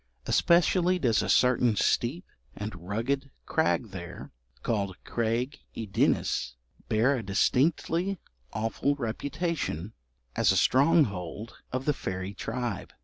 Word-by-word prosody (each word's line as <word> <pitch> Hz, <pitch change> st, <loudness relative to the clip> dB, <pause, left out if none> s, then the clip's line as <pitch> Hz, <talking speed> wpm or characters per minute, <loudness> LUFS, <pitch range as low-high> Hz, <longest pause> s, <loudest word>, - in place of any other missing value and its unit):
Especially 180 Hz, +1 st, +3 dB
does 120 Hz, -10 st, +2 dB
a -, -, -3 dB
certain 125 Hz, -3 st, +4 dB
steep 130 Hz, -, +1 dB, 0.3 s
and 105 Hz, +1 st, -5 dB
rugged 135 Hz, +7 st, -1 dB, 0.2 s
crag 160 Hz, -7 st, +1 dB
there, 85 Hz, -2 st, -8 dB, 0.3 s
called 100 Hz, -5 st, -1 dB
Craig 120 Hz, +5 st, -1 dB, 0.2 s
y 115 Hz, -, -3 dB
Ddinas, 95 Hz, -, +1 dB, 0.3 s
bear 115 Hz, +6 st, +3 dB
a -, -, -3 dB
distinctly 160 Hz, -, +1 dB, 0.3 s
awful 115 Hz, +6 st, 0 dB
reputation 140 Hz, -, -3 dB, 0.4 s
as -, -, +4 dB
a -, -, +2 dB
stronghold 115 Hz, -, +2 dB, 0.2 s
of 130 Hz, +1 st, -2 dB
the 150 Hz, -, +3 dB
fairy 95 Hz, -5 st, -4 dB
tribe. 120 Hz, 0 st, -4 dB
120 Hz, 115 wpm, -28 LUFS, 105-145 Hz, 0.4 s, certain